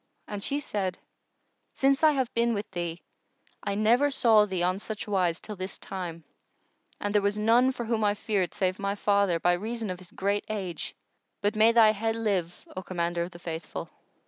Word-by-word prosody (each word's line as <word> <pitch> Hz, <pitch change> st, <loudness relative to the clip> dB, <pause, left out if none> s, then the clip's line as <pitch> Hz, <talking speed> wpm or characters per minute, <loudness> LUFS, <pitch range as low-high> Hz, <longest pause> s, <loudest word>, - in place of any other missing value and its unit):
and 205 Hz, -1 st, -5 dB
she 285 Hz, -, -1 dB
said, 195 Hz, -9 st, -2 dB, 0.8 s
"Since 275 Hz, +1 st, +3 dB
I 310 Hz, -1 st, +6 dB
have 260 Hz, -4 st, -1 dB
been 235 Hz, 0 st, +2 dB
with 205 Hz, +1 st, -4 dB
thee, 175 Hz, -2 st, -4 dB, 0.6 s
I 200 Hz, -1 st, -2 dB
never 235 Hz, +7 st, +4 dB
saw 225 Hz, -6 st, +5 dB
thee 185 Hz, -3 st, -1 dB
on 185 Hz, +2 st, +1 dB
such 215 Hz, +1 st, -6 dB
wise 180 Hz, -4 st, +1 dB
till 210 Hz, -, -7 dB
this 185 Hz, 0 st, -5 dB
time, 175 Hz, -4 st, -6 dB, 0.8 s
and 205 Hz, 0 st, -2 dB
there 210 Hz, -, +4 dB
was 200 Hz, +1 st, 0 dB
none 235 Hz, +4 st, +4 dB
for 245 Hz, -2 st, -5 dB
whom 225 Hz, -1 st, 0 dB
I 205 Hz, 0 st, +3 dB
feared 200 Hz, -4 st, -1 dB
save 185 Hz, -1 st, 0 dB
my 200 Hz, 0 st, -1 dB
father, 200 Hz, -4 st, +2 dB
by 175 Hz, +2 st, +3 dB
reason 220 Hz, +3 st, -3 dB
of 180 Hz, -, -6 dB
his 185 Hz, -2 st, -13 dB
great 200 Hz, +1 st, -1 dB
age; 190 Hz, -5 st, -4 dB, 0.4 s
but 205 Hz, +2 st, 0 dB
may 220 Hz, +2 st, +6 dB
thy 225 Hz, -2 st, +7 dB
head 225 Hz, +1 st, -1 dB
live, 195 Hz, -6 st, -1 dB
O 185 Hz, -, -3 dB
Commander 175 Hz, -2 st, -2 dB
of 170 Hz, -, -2 dB
the 175 Hz, -, -12 dB
Faithful!" 165 Hz, -1 st, -6 dB
205 Hz, 195 wpm, -28 LUFS, 185-225 Hz, 0.8 s, thy